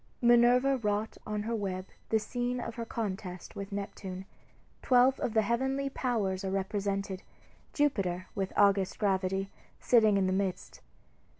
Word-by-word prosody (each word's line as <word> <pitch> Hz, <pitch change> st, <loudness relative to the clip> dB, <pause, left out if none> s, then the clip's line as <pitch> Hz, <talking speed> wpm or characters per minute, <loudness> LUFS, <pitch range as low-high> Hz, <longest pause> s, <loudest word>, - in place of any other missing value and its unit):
Minerva 245 Hz, +3 st, +5 dB
wrought 210 Hz, -1 st, -2 dB
on 210 Hz, -1 st, -2 dB
her 230 Hz, +2 st, -2 dB
web 190 Hz, -3 st, -3 dB, 0.2 s
the 220 Hz, -, +3 dB
scene 245 Hz, +3 st, -2 dB
of 230 Hz, -, -5 dB
her 230 Hz, 0 st, -5 dB
contest 190 Hz, -5 st, -5 dB
with 200 Hz, +1 st, -6 dB
Neptune. 195 Hz, -1 st, -5 dB, 0.6 s
Twelve 255 Hz, +1 st, +4 dB
of 225 Hz, -, -2 dB
the 220 Hz, -, +4 dB
heavenly 265 Hz, +5 st, 0 dB
powers 210 Hz, -9 st, -1 dB
are 190 Hz, -, -2 dB
represented, 195 Hz, 0 st, -2 dB, 0.5 s
Jupiter, 195 Hz, -, 0 dB
with 195 Hz, -1 st, -2 dB
august 200 Hz, -2 st, +3 dB
gravity, 195 Hz, -1 st, 0 dB, 0.3 s
sitting 220 Hz, -4 st, +4 dB
in 195 Hz, -, +2 dB
the 185 Hz, -, +1 dB
midst. 190 Hz, -1 st, -3 dB
205 Hz, 140 wpm, -30 LUFS, 190-240 Hz, 0.6 s, Minerva